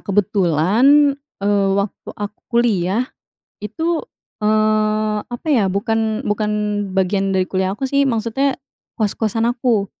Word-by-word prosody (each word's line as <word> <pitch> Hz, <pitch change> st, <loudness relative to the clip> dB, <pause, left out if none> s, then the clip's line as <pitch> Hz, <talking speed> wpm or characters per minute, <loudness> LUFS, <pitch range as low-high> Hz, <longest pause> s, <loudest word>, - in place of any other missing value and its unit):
kebetulan, 205 Hz, -, +3 dB, 0.3 s
eee, 200 Hz, -1 st, +2 dB
waktu 200 Hz, 0 st, -3 dB
aku 205 Hz, +1 st, -6 dB
kuliah, 230 Hz, -2 st, +1 dB, 0.6 s
itu, 320 Hz, -, -2 dB, 0.4 s
eee, 215 Hz, 0 st, +2 dB
apa 240 Hz, +6 st, -9 dB
ya. 215 Hz, -9 st, +3 dB
Bukan 220 Hz, +3 st, -1 dB
bukan 210 Hz, 0 st, 0 dB, 0.4 s
bagian 195 Hz, +1 st, +1 dB
dari 185 Hz, -1 st, +1 dB
kuliah 190 Hz, 0 st, -1 dB
aku, 270 Hz, -, -1 dB
sih. 280 Hz, +1 st, +2 dB
Maksudnya, 260 Hz, +2 st, 0 dB, 0.4 s
kos-kosan 220 Hz, +1 st, 0 dB
aku. 235 Hz, -4 st, +1 dB
215 Hz, 115 wpm, -19 LUFS, 200-240 Hz, 0.6 s, kebetulan